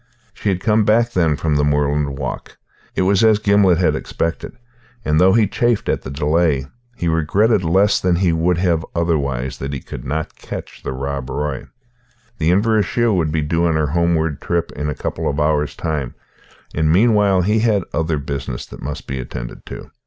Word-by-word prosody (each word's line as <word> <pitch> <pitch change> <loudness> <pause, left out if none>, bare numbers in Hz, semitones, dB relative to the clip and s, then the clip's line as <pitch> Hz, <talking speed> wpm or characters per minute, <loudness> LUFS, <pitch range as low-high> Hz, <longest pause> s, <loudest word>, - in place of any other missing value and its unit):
She 105 - -2
had 90 -2 -1
come 110 0 +3
back, 115 +3 +3
then, 85 -8 +2
from 75 0 -1
her 75 - +2
moorland 75 -1 0
walk. 65 -3 -6 0.4
It - - +1
was 100 +2 +3
as 110 -1 +5
Gimblet 100 -4 +3
had 90 -1 +2
expected; 85 0 -3 0.5
and, 75 +2 +2
though 95 +1 +5
he 115 -1 +4
chafed 120 +2 0
at - - 0
the - - -7
delay, 75 0 +1 0.3
he 85 - -3
regretted 95 +6 +2
less 95 +5 +3
than 90 -1 +2
he 90 -1 +2
would 85 +2 +1
have 85 -3 +1
otherwise 70 -6 -1
that 70 +1 -4
he 70 - -3
could - - -9
not 75 +4 -3
catch - - -8
the - - -4
Rob 70 0 -4
Roy. 70 0 -3 0.7
The 80 0 +2
Inverashiel 110 +3 +2
would 80 -4 0
be 80 0 0
due 85 +3 +1
on 80 - +1
her 75 -2 +1
homeward 80 -3 +1
trip 85 -1 -1
in 75 +1 -4
a 75 - -3
couple - - -3
of 70 - -2
hours' 75 -1 +1
time, 75 -7 -3 0.6
and 80 0 +1
meanwhile 100 -1 +4
he 105 +4 +2
had 105 -4 +2
other 80 -1 0
business 70 -3 -4
that - - -12
must 75 +2 -5
be 65 0 -4
attended - - -7
to. - - -9
80 Hz, 190 wpm, -19 LUFS, 75-95 Hz, 0.7 s, as